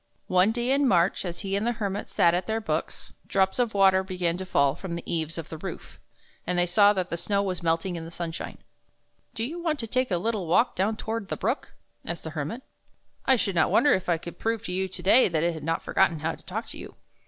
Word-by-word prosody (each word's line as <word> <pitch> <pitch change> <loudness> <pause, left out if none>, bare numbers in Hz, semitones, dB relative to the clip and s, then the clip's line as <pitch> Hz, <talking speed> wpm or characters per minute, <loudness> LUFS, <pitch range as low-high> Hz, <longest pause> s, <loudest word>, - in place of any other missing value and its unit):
One 185 +3 +4
day 240 +2 -1
in 280 0 +3
March, 175 -4 +3
as 175 -1 -3
he 195 0 -2
and 205 +3 0
the 240 - +1
Hermit 205 -2 -3
sat 170 -1 +3
at 180 +1 -1
their 220 +1 0
books, 220 - -4
drops 190 +3 +1
of 235 -4 +1
water 190 -1 +5
began 180 -3 -1
to 190 0 -6
fall 140 -6 +3
from 170 +2 -6
the 170 - -6
eaves 160 -1 -2
of 165 -1 -6
the 160 - -7
roof, 190 - -8 0.5
and 180 - 0
they 175 - +4
saw 200 +4 +5
that 185 -3 -3
the 170 - -1
snow 200 +3 0
was 185 -3 -2
melting 170 +2 0
in 165 - -5
the 165 - -8
sunshine. 165 -1 -5 0.4
" - - -44
Do 225 - -2
you 325 +8 -4
want 320 -3 0
to 230 - -4
take 255 +3 0
a 180 - +1
little 205 -1 -2
walk 205 +9 +3
down 210 +4 0
toward 225 -2 -4
the - - -3
brook? 235 +8 -2
" - - -46
asked 170 -1 -5
the 160 - -6
Hermit. 155 - -4 0.3
" - - -43
I 265 - +7
should 205 -5 -1
not 165 -2 +3
wonder 290 - +4
if 185 -1 -1
I 170 - +3
could 170 +1 -10
prove 225 -1 -1
to 180 - -5
you 190 +1 -1
to 190 - -7
day 230 +7 +6
that 160 -2 0
it 170 0 +1
has 160 - -7
not 165 +2 -1
forgotten 160 -2 +2
how 160 +1 -1
to - - -14
talk 220 +5 -4
to - - -9
you." - - -10
190 Hz, 265 wpm, -26 LUFS, 170-220 Hz, 0.5 s, I